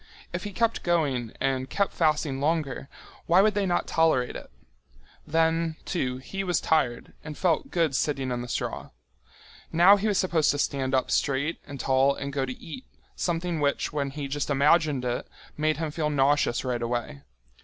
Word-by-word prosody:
If -, -, -4 dB
he 205 Hz, -, -4 dB
kept 230 Hz, +3 st, 0 dB
going 140 Hz, -9 st, 0 dB
and 135 Hz, -1 st, -1 dB
kept 200 Hz, -1 st, 0 dB
fasting 150 Hz, -4 st, +1 dB
longer, 145 Hz, -3 st, -1 dB, 0.4 s
why 175 Hz, +3 st, +6 dB
would 215 Hz, +1 st, +3 dB
they 200 Hz, -1 st, 0 dB
not 175 Hz, -1 st, +1 dB
tolerate 160 Hz, -7 st, +2 dB
it? -, -, -8 dB, 0.8 s
Then, 165 Hz, 0 st, +1 dB
too, 130 Hz, -8 st, -2 dB
he 195 Hz, +9 st, -5 dB
was 180 Hz, -3 st, +1 dB
tired 130 Hz, -7 st, 0 dB
and 150 Hz, -1 st, -7 dB
felt 170 Hz, -4 st, +1 dB
good 165 Hz, -6 st, +1 dB
sitting 135 Hz, -2 st, -1 dB
in 120 Hz, 0 st, -2 dB
the 120 Hz, -, -6 dB
straw. -, -, -4 dB, 0.8 s
Now 180 Hz, +5 st, +7 dB
he 205 Hz, +2 st, -1 dB
was 205 Hz, -3 st, +1 dB
supposed 170 Hz, -5 st, +2 dB
to 145 Hz, -, +2 dB
stand 135 Hz, -2 st, 0 dB
up 130 Hz, -, 0 dB
straight 140 Hz, +4 st, 0 dB
and 140 Hz, -2 st, -8 dB
tall 135 Hz, +2 st, +3 dB
and 140 Hz, 0 st, -5 dB
go 135 Hz, -1 st, -1 dB
to 125 Hz, -, -4 dB
eat, 255 Hz, +11 st, -9 dB, 0.3 s
something 170 Hz, -1 st, -1 dB
which, 145 Hz, 0 st, 0 dB
when 140 Hz, -2 st, -1 dB
he 140 Hz, 0 st, -5 dB
just 145 Hz, +1 st, -3 dB
imagined 145 Hz, -1 st, +3 dB
it, 120 Hz, 0 st, -2 dB, 0.3 s
made 155 Hz, +1 st, 0 dB
him 160 Hz, -1 st, -3 dB
feel 150 Hz, 0 st, -1 dB
nauseous 140 Hz, -3 st, +2 dB
right 125 Hz, -2 st, -1 dB
away. 120 Hz, -, -3 dB
150 Hz, 180 wpm, -26 LUFS, 135-165 Hz, 0.8 s, Now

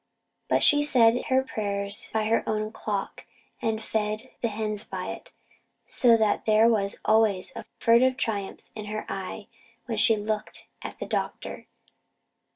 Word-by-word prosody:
But -, -, +3 dB
she 290 Hz, 0 st, +5 dB
said 245 Hz, -5 st, +4 dB
her 260 Hz, 0 st, +2 dB
prayers 200 Hz, -3 st, -3 dB
by 220 Hz, -1 st, 0 dB
her 225 Hz, +1 st, +2 dB
own 215 Hz, 0 st, -1 dB
clock, 205 Hz, -3 st, -4 dB, 0.4 s
and 220 Hz, -2 st, 0 dB
fed 215 Hz, +3 st, -2 dB
the 235 Hz, -, +1 dB
hens 215 Hz, -1 st, -3 dB
by -, -, -5 dB
it; -, -, -10 dB, 0.6 s
so 235 Hz, -3 st, +4 dB
that 215 Hz, -1 st, +1 dB
there 215 Hz, +1 st, +5 dB
was 205 Hz, -3 st, +1 dB
always 215 Hz, -4 st, +3 dB
a -, -, -7 dB
furtive 250 Hz, +3 st, +4 dB
triumph 205 Hz, -6 st, -3 dB
in 215 Hz, -1 st, -7 dB
her 215 Hz, +1 st, -4 dB
eye 195 Hz, +2 st, -5 dB, 0.4 s
when 230 Hz, -3 st, -3 dB
she 225 Hz, 0 st, +6 dB
looked 210 Hz, 0 st, -4 dB, 0.2 s
at -, -, -7 dB
the -, -, -5 dB
doctor. -, -, -4 dB
220 Hz, 155 wpm, -26 LUFS, 210-230 Hz, 0.6 s, she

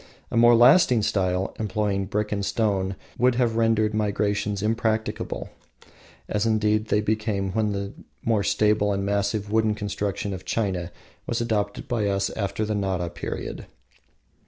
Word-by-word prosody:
A -, -, -3 dB
more 120 Hz, +1 st, +7 dB
lasting 120 Hz, -, +6 dB
style, 95 Hz, -2 st, 0 dB
employing 105 Hz, -2 st, -1 dB
brick 105 Hz, +1 st, -2 dB
and 100 Hz, -1 st, -1 dB
stone, 100 Hz, -3 st, 0 dB, 0.2 s
would 125 Hz, 0 st, +4 dB
have 120 Hz, -2 st, +1 dB
rendered 110 Hz, -1 st, +2 dB
migrations 105 Hz, -1 st, 0 dB
impracticable, 110 Hz, 0 st, -1 dB, 0.8 s
as 105 Hz, -1 st, 0 dB
indeed 110 Hz, -1 st, +2 dB
they 105 Hz, -, +2 dB
became 105 Hz, -3 st, -1 dB
when 105 Hz, +1 st, 0 dB
the 100 Hz, 0 st, -4 dB, 0.3 s
more 110 Hz, -3 st, +2 dB
stable 105 Hz, 0 st, +2 dB
and 100 Hz, 0 st, -2 dB
massive 100 Hz, +1 st, -1 dB
wooden 110 Hz, -1 st, +2 dB
construction 100 Hz, -1 st, -3 dB
of 95 Hz, -1 st, -7 dB
China 95 Hz, -5 st, -2 dB, 0.4 s
was 120 Hz, -, -1 dB
adopted 105 Hz, -3 st, -2 dB
by 110 Hz, -4 st, 0 dB
us 100 Hz, 0 st, 0 dB
after 100 Hz, 0 st, -2 dB
the 105 Hz, -, -2 dB
Nara 95 Hz, -4 st, -1 dB
period. -, -, -6 dB
105 Hz, 145 wpm, -25 LUFS, 100-110 Hz, 0.8 s, more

